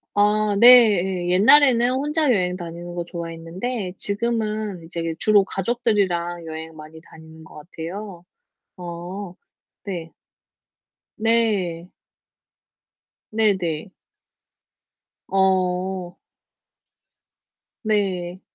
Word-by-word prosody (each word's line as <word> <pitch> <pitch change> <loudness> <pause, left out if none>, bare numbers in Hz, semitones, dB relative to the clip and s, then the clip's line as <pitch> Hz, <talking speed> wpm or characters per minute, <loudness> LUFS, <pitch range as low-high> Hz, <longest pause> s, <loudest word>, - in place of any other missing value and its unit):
아, 210 0 +2
네예. 200 -7 +6
옛날에는 240 +6 +5
혼자 295 +4 0
여행 180 -3 0
다니는 175 0 -8
거 175 -1 -4
좋아했는데 175 +5 -5
지금은 215 -3 -2
이제 165 0 -5
주로 210 -2 +4
가족들이랑 190 -6 -1
여행 160 0 -8
많이 155 +1 -12
다니는 160 -1 -15
것 - - -16
같아요. 175 +4 -8 0.5
어, 175 +2 -7 0.5
네. 175 -5 -6 1.1
네. 210 -7 0 1.4
네네. 190 -6 0 1.4
어. 185 -1 0 1.7
네. 185 -4 -1
185 Hz, 160 characters per minute, -22 LUFS, 170-215 Hz, 1.7 s, 네예